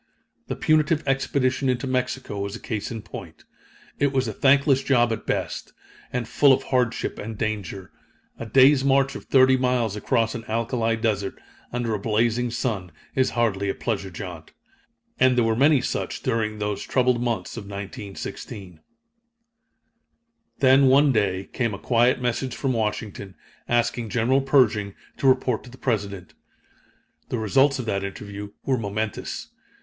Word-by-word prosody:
The - - -3
punitive 155 0 +2
expedition 135 -1 +1
into 125 +1 0
Mexico 125 -4 -2
was 100 0 -3
a - - -7
case 105 -3 -4
in 115 -3 -6
point. - - -10 0.6
It 140 -1 +2
was 130 -2 0
a 110 - -3
thankless 135 +2 +4
job 120 -4 +3
at 110 - -7
best, - - -3 0.4
and 125 -2 -2
full 140 +3 +4
of - - 0
hardship 125 -3 -1
and 110 0 -6
danger. 100 -4 -4 0.5
A 115 - -5
day's 135 +3 +5
march 135 0 +3
of - - -8
thirty 130 -1 +5
miles 125 -5 0
across 115 +1 0
an 115 - -6
alkali 115 0 0
desert, 105 -4 -2 0.3
under 120 -2 -1
a 105 - -1
blazing 115 +3 +1
sun, 110 -7 -3 0.2
is 130 -1 +2
hardly 100 -4 +1
a - - -1
pleasure 100 -5 -3
jaunt. 85 -3 -8 0.7
And 130 -1 +4
there 120 - +4
were 115 0 +1
many 140 +2 +4
such - - -3
during 110 -1 -1
those 105 -1 -2
troubled 125 -2 +1
months 115 -7 -2
of 115 -4 -7
1916. 100 -2 -7 1.8
Then, 135 0 +6
one 140 +2 +5
day, 100 -5 0
came 115 -5 -1
a - - -7
quiet 120 +3 +2
message 125 +1 -2
from 135 -2 -1
Washington, 105 -3 -3 0.3
asking 120 -1 0
General 125 +5 +2
Pershing 110 -7 +2 0.2
to 135 - +1
report 130 -3 +2
to - - -11
the 130 - -13
President. 100 - -3 1.0
The 125 - -1
results 135 +6 +3
of 125 - -4
that 100 -3 -1
interview 100 +1 -6 0.2
were 130 -3 +1
momentous. 110 0 -4
115 Hz, 155 wpm, -24 LUFS, 105-130 Hz, 1.8 s, Then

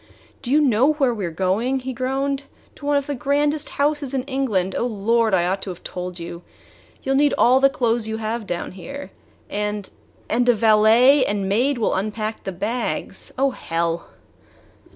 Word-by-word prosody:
"Do 240 - -6
you 290 +4 +4
know 265 +2 +4
where 270 -5 +1
we 205 -6 -3
are - - -3
going?" 195 +10 0
he 260 +1 -4
groaned. 270 +2 -2 0.3
"To 285 - -9
one 290 0 +3
of 280 - -1
the 290 - -3
grandest 290 +2 0
houses 285 -2 0
in 260 - 0
England! 245 -9 -1
Oh, 240 - 0
Lord! 225 0 +2
I 175 -1 +2
ought 190 +2 -1
to 195 - -5
have 180 -1 -8
told 180 0 -6
you. 170 0 -7 0.6
You 270 - -1
'll - - +2
need 290 0 +3
all 255 +2 +5
the 275 0 +5
clothes 235 -4 0
you 220 0 -3
have 220 0 -3
down 175 -2 -3
here. 275 +10 -8 0.4
And 210 -1 -3 0.4
and 245 +2 +1
a 240 - +6
valet 225 +5 +5
and 200 -1 -1
maid 245 +8 +1
will 225 - +1
unpack 215 +3 -3
the 195 - -2
bags 210 +7 -3
oh, 270 +1 +2
hell!" 170 -5 -2
235 Hz, 190 wpm, -22 LUFS, 200-270 Hz, 0.6 s, a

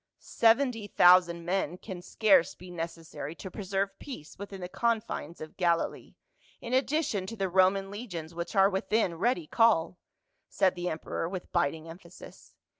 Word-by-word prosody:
" - - -61 0.2
Seventy 230 -1 +3
thousand 175 -3 +5
men 180 -2 -1
can 185 -2 -8
scarce 195 -1 +3
be 180 0 -12
necessary 165 -3 -6
to 190 +2 -9
preserve 195 0 -3
peace 205 - -9
within 200 -1 -7
the 180 - -5
confines 215 -6 -2
of 155 - -10
Galilee, 170 -2 -1 0.4
in 235 - -6
addi 290 +4 +2
tion 190 -3 -3
to 230 - -6
the 195 -1 0
Roman 190 +2 +2
legions 175 -7 -7
which 170 +5 -5
are 195 0 +6
within 195 0 0
ready 235 -8 +1
call," 180 -3 +2 0.5
said 190 -2 +2
the 175 0 -3
emperor 160 +1 -4
with 185 -1 -7
biting 160 -2 0
emphasis. 170 +1 -13
185 Hz, 160 wpm, -29 LUFS, 170-205 Hz, 0.5 s, are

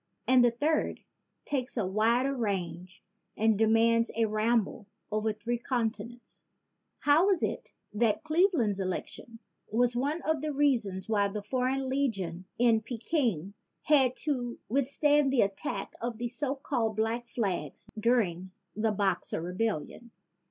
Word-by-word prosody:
And 255 0 +5
the 240 - +6
third 295 +7 0 0.4
takes 265 -2 -3
a 220 - +1
wider 230 +8 +2
range 185 -5 -4 0.3
and 220 0 +3
demands 225 +2 +3
a 225 0 +2
ramble 215 -1 0 0.2
over 215 +1 0
three 230 +3 -3
conti 230 -4 -1
nents: 240 +1 -15 0.6
How 300 +6 +4
was 385 -4 +2
it - - -3 0.2
that 210 +1 +1
Cleveland's 310 - +2
election 190 +5 -5 0.3
was 240 +2 +2
one 285 +7 -1
of 315 -2 0
the 305 0 -2
reasons 240 -10 +1
why 205 -2 +2
the 205 +1 -5
foreign 255 +4 0
lega 265 -2 0
tions 180 -1 -5
in 230 -2 +4
Peking 230 - -1 0.3
had 265 -4 +4
to 245 -5 -2
withstand 280 +2 +2
the 265 - +3
attacks 195 -1 -2
of 235 -1 -3
the 240 +1 -3
so 270 +3 -2
called 240 -6 -1
Black 225 +3 -1
Flags 190 - -3
during 200 -6 +1 0.3
the 215 +1 +1
Boxer 195 -5 -1
Rebellion? 185 +5 -3
230 Hz, 140 wpm, -29 LUFS, 210-260 Hz, 0.6 s, the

